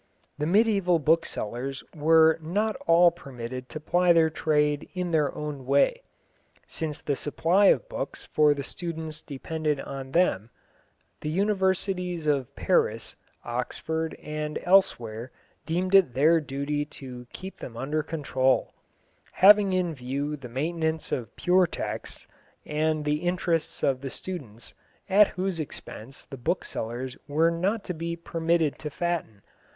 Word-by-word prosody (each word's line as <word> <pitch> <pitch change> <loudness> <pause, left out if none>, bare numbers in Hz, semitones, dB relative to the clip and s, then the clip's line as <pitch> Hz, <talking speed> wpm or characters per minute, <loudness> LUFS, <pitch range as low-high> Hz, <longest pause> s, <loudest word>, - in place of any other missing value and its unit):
The 150 - 0
mediæval 195 -5 +3
booksellers 135 -5 0
were 160 +1 +5
not 205 +7 -1
all 170 +1 +6
permitted 130 -5 -8
to 155 - -6
ply 175 +3 +3
their 160 -1 +4
trade 150 -2 +1
in 180 -1 -2
their 150 -4 +2
own 150 -3 -5
way. 140 - +3 0.6
Since 155 -2 -5
the 145 - -1
supply 170 +8 +2
of - - +3
books - - -5
for 150 -1 +3
the 140 - -4
students 160 -1 -5
depended 150 +1 -3
on 135 -1 -6
them, 120 - +2 0.7
the 150 - -3
Universities 190 -2 0
of 140 -4 0
Paris, - - 0 0.3
Oxford, 160 +7 -3
and 150 0 -4
elsewhere 120 - +2 0.4
deemed 180 +3 -1
it 190 -11 +5
their 160 +5 +5
duty 145 +1 -2
to 125 -4 -10
keep 190 +1 -9
them 115 -2 -8
under 150 +5 -1
control, 140 -4 0 0.6
having 200 0 +7
in 180 -3 0
view 140 +3 -3
the 135 -4 -10
maintenance 160 +4 -2
of 115 -5 -3
pure 180 0 +3
texts - - -6 0.4
and 155 0 0
the 150 0 +1
interests 175 -1 -1
of 130 -2 +1
the 135 - -4
students, 130 - -7 0.3
at 200 +1 +6
whose 185 -2 -1
expense 135 -4 -7
the 135 - -9
booksellers 125 -3 -3
were 160 +3 +3
not 190 +6 -1
to 180 - -4
be 170 +1 -4
permitted 165 -2 0
to 150 - -4
fatten. 155 - -3
155 Hz, 135 wpm, -27 LUFS, 140-175 Hz, 0.7 s, having